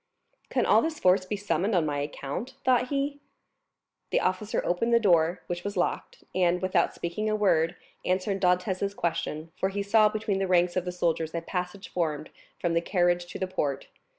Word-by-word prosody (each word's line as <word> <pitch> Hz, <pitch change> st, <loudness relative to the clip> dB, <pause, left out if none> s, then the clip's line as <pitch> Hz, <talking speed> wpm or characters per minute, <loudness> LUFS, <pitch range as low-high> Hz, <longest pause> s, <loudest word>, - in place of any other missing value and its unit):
"Can -, -, +1 dB
all -, -, +5 dB
this 315 Hz, -1 st, -2 dB
force 185 Hz, +1 st, +4 dB
be 210 Hz, -, -1 dB
summoned 205 Hz, 0 st, 0 dB
on 170 Hz, -3 st, +3 dB
my 145 Hz, -1 st, -1 dB
account?" 145 Hz, -, -5 dB
thought 250 Hz, -1 st, +3 dB
he. 280 Hz, +1 st, -2 dB, 0.9 s
The -, -, +2 dB
officer 185 Hz, +4 st, -1 dB
opened 230 Hz, +7 st, +2 dB
the -, -, +6 dB
door, 175 Hz, -5 st, +3 dB
which 175 Hz, 0 st, -4 dB
was 205 Hz, -1 st, -4 dB
locked, 175 Hz, -, -2 dB
and, 180 Hz, -1 st, +2 dB
without 185 Hz, +1 st, +1 dB
speaking 190 Hz, +6 st, -2 dB
a 215 Hz, -, +1 dB
word, 175 Hz, -5 st, +2 dB, 0.3 s
answered 190 Hz, +1 st, 0 dB
Dantès' 185 Hz, +2 st, +1 dB
question; 165 Hz, -2 st, -2 dB
for 190 Hz, -, 0 dB
he 200 Hz, +1 st, -2 dB
saw 210 Hz, +1 st, +5 dB
between 215 Hz, -2 st, -1 dB
the 195 Hz, -, 0 dB
ranks 180 Hz, -1 st, +3 dB
of 185 Hz, -1 st, 0 dB
the 180 Hz, -, -2 dB
soldiers 165 Hz, -2 st, -1 dB
a 170 Hz, -, -1 dB
passage 180 Hz, +3 st, -4 dB
formed 155 Hz, -4 st, -2 dB, 0.3 s
from 170 Hz, -1 st, -1 dB
the 170 Hz, -, +2 dB
carriage 175 Hz, -1 st, +1 dB
to 180 Hz, -, -7 dB
the 190 Hz, -, -1 dB
port. 150 Hz, -7 st, -2 dB
185 Hz, 190 wpm, -27 LUFS, 170-205 Hz, 0.9 s, the